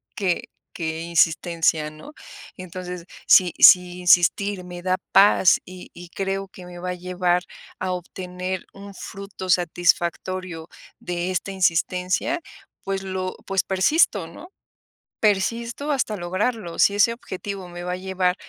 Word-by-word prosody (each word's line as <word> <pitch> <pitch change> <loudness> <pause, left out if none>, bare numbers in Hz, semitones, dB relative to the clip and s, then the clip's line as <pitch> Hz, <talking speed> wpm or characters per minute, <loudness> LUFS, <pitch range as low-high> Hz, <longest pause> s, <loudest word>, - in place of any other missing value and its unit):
que 185 -4 -1 0.3
que 160 -1 -4
insistencia", 165 -2 +1
¿no? 155 - -13 0.4
Entonces, 180 -1 -7 0.2
si 180 -2 +6
si 180 0 +7
insistir 180 +2 +3
me 175 0 -8
da 185 0 +2 0.2
paz, 195 -2 +6
y 185 0 -11
y 175 0 -11
creo 195 0 -3
que 185 -1 -13
me 180 0 -10
va 180 +1 -3
a - - -2
llevar 180 0 0 0.3
a 185 - -2
obtener 180 +1 -5
un 200 0 -11
fruto 195 -1 -8
satisfactorio 175 0 0 0.3
de 175 +1 -3
esta 185 +2 -2
insistencia, 185 - 0 0.4
pues 195 0 -3
lo 185 -1 -4
pues, 195 -1 0
persisto, 195 - +2
¿no?, 235 - -12 0.7
persisto 230 +7 0
hasta 235 -7 -1
lograrlo, 185 +1 -2
si 200 - +4
ese 225 +3 +4
objetivo 195 -4 -7
me 175 0 -8
va 180 - -3
a 180 - -1
llevar 185 -1 0
185 Hz, 135 wpm, -23 LUFS, 175-195 Hz, 0.7 s, si